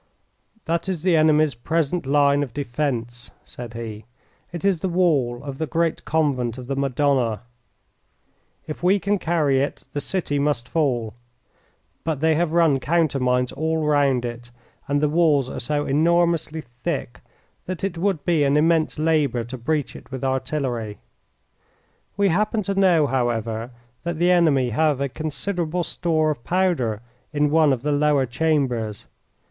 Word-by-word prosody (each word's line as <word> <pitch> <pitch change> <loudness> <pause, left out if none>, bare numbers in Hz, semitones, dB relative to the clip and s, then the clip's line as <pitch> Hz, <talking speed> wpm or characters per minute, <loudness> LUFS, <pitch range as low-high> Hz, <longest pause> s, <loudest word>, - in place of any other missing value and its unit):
"That 170 +3 -1
is 175 -4 -3
the 180 -2 +3
enemy's 155 -2 +4
present 160 +5 -1
line 140 0 +3
of 135 -5 -4
defence," 120 -3 -3 0.2
said 120 -2 -9
he. 110 -2 -7 0.5
"It 175 +1 -5
is 190 -5 +2
the 190 - -1
wall 145 -9 +1
of 140 -2 -7
the 160 - -1
great 165 0 -1
Convent 135 -7 0
of 125 - -7
the 135 +2 -3
Madonna. 135 -4 +1 1.2
If 155 - -7
we 190 +3 +3
can 200 +2 0
carry 150 -6 +1
it 140 - -3
the 145 - -2
city 145 -4 -1
must 140 -4 0
fall, 125 -9 0 0.9
but 160 -4 -2
they 160 +2 +3
have 160 +1 0
run 165 -5 +3
countermines 130 -6 +1
all 160 0 -1
round 140 -4 +2
it, 120 0 -7 0.4
and 145 0 +1
the 150 - +3
walls 150 -4 +3
are - - -5
so 145 +4 -1
enormously 165 +1 +1 0.2
thick - - -3 0.5
that 185 0 -5
it 195 -3 -1
would 175 -2 -1
be 165 -4 +3
an 140 +1 +3
immense 160 +1 +2
labour 150 -6 +1
to 120 +3 -7
breach 145 +4 -2
it - - -12
with 130 -1 -6
artillery. 130 -5 -2 1.2
We 200 -1 +3
happen 210 +4 +1
to 200 +1 -1
know, 185 -6 +4
however, 120 -3 -1 0.3
that 170 -1 -3
the 175 +2 +3
enemy 145 -8 +3
have 150 +3 +2
a 140 0 -1
considerable 170 +4 -2
store 155 -2 0
of 140 -6 -6
powder 160 - 0 0.3
in 145 -1 +1
one 155 -2 +4
of 130 -2 -1
the 150 - 0
lower 145 -2 +2
chambers. 125 -6 -1
150 Hz, 155 wpm, -23 LUFS, 130-165 Hz, 1.2 s, enemy's